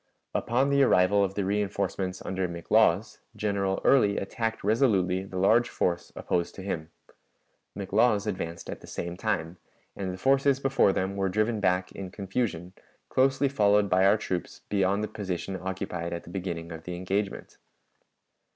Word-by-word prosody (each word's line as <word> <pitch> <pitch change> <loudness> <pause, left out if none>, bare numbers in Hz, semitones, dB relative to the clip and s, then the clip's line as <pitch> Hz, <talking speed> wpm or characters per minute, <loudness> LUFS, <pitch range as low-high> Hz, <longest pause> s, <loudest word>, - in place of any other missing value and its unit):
Upon 130 +4 +1
the 140 0 +4
arrival 100 -5 +4
of 95 0 -2
the 100 - 0
reënforcements 100 -2 -2
under 95 -1 -1
McLaws, 85 -1 +2 0.2
General 100 -2 -1
Early 105 -7 +4
attacked 110 +3 -3
resolutely 100 -5 +2
the 95 -1 -7
large 115 +6 +4
force 85 -1 -1
opposed 85 -1 -2
to 95 - -8
him. 80 -5 -4 0.9
McLaws 100 +2 +2
advanced 85 -5 -4
at - - -6
the - - -13
same 85 0 -5
time, 90 -4 -2 0.4
and 95 -2 -3
the 90 - -6
forces 135 +4 +3
before 135 -6 +3
them 95 +1 -2
were 95 -1 +1
driven 110 +3 0
back 90 -2 +1
in 95 -2 -7
confusion, 95 -3 -3 0.4
closely 135 +1 +3
followed 105 -6 +3
by 95 +1 +4
our 100 +3 +5
troops 90 -4 -4
beyond 100 +1 +1
the - - -1
position 95 -3 -4
occupied 95 -2 -4
at 85 - -5
the 85 - -12
beginning 85 -3 -4
of 80 0 -8
the 90 - -4
engagement. 95 +3 -3
95 Hz, 160 wpm, -28 LUFS, 90-105 Hz, 0.9 s, our